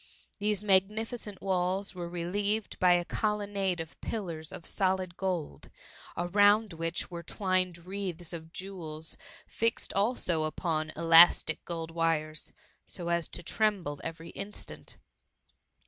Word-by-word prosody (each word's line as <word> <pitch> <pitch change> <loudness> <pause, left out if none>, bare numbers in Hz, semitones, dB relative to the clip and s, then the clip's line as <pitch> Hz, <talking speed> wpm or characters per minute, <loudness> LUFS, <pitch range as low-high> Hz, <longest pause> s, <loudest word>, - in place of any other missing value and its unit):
These 210 -1 +1
magni 205 +2 +3
ficent 220 -4 -7
walls 190 +1 0
were 175 -2 -5
relieved 200 +5 -2
by 180 -1 +6
a 175 0 +2
colonnade 205 -4 0
of 165 -1 -8
pillars 165 -8 -4
of 165 - -8
solid 185 -2 0
gold, 180 -5 -3 0.5
around 205 +3 +4
which 165 +2 -3
were 170 -1 -5
twined 185 -2 -1
wreaths 180 -3 -4
of 165 -1 -7
jewels 165 -5 -6 0.3
fixed 230 0 0
also 195 -6 +1
upon 155 0 -1
elastic 165 0 +6
gold 165 -1 -4
wires, 160 -2 -1 0.4
so 170 -2 -4
as 170 -1 +1
to 175 - -6
tremble 185 -8 0
every 165 0 -6
instant. 200 +1 -3
180 Hz, 125 wpm, -30 LUFS, 165-200 Hz, 0.5 s, by